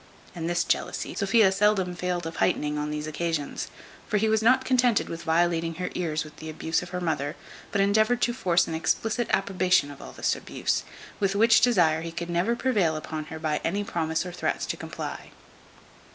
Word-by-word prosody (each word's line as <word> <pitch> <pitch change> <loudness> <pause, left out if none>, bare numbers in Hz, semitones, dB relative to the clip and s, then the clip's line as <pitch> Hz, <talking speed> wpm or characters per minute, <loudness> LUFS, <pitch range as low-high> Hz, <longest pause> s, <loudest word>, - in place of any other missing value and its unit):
And 165 -1 -3
this 175 0 +1
jealousy - - -1
Sophia 200 0 +4
seldom 190 -2 +2
failed 180 -1 -2
of 165 - -6
heightening 150 -4 +1
on 150 0 -2
these 150 0 -3
occasions; 155 -1 -3 0.4
for 210 - +1
he 220 +2 +2
was 220 0 +2
not 255 +3 +4
contented 250 -3 +3
with 165 0 -5
violating 165 0 +1
her 180 +2 -4
ears 160 -3 -1
with 150 -1 -13
the 160 - -7
abuse 160 +1 -1
of 180 - -8
her 180 - -3
mother, 155 -4 -1 0.4
but 200 - +2
endeavoured 215 +4 +3
to 240 - +2
force 175 -8 +2
an 165 - -4
explicit 225 +8 0
approbation 185 -6 +2
of 140 - -12
all - - -9
this - - 0
abuse; - - -2 0.4
with 195 -1 +1
which 225 +2 +5
desire 175 -10 +4
he 165 0 -6
never 175 +6 +1
could 235 - -7
prevail 200 -12 +2
upon 155 0 -5
her 160 - -7
by 155 -1 -1
any 200 +5 0
promise 160 -3 -1
or 180 - -5
threats 180 - -2
to - - -3
comply. - - -6
175 Hz, 195 wpm, -26 LUFS, 160-205 Hz, 0.4 s, which